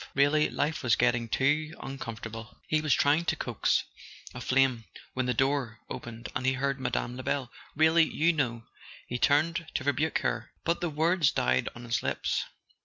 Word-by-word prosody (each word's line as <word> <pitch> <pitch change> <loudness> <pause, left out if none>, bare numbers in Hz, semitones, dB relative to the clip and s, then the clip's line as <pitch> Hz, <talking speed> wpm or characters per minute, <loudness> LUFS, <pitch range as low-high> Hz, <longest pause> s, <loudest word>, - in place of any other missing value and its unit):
Really, 145 +2 +4
life 160 +2 -1
was 125 -5 +3
getting 120 -1 +1
too 150 +6 +1
uncomfortable... 115 -4 -7
He 155 - +2
w - - 0
T - - -8
as 150 - +5
trying 150 +4 +3
to - - +1
coax - - 0 0.5
a - - -7
flame 130 -3 +2 0.3
when 130 -1 -1
the 125 - +2
door 135 -4 0
opened 115 0 -7
and 130 - -1
he 130 0 +3
heard 135 +1 -1
Mme. 125 -1 -2
Lebel. 130 -1 -2 0.2
"Really, 160 +2 +5
you 170 +2 +2
know 120 -6 -1 0.2
" - - -17
he 125 - -2
turned 160 +5 +2
to - - -1
rebuke 145 +3 +1
her; - - -2
but 170 +1 0
the 175 - 0
words 160 +1 +2
died 65 +1 +1
on 120 - -9
his 120 0 -1
lips. - - -1
135 Hz, 185 wpm, -29 LUFS, 120-155 Hz, 0.5 s, as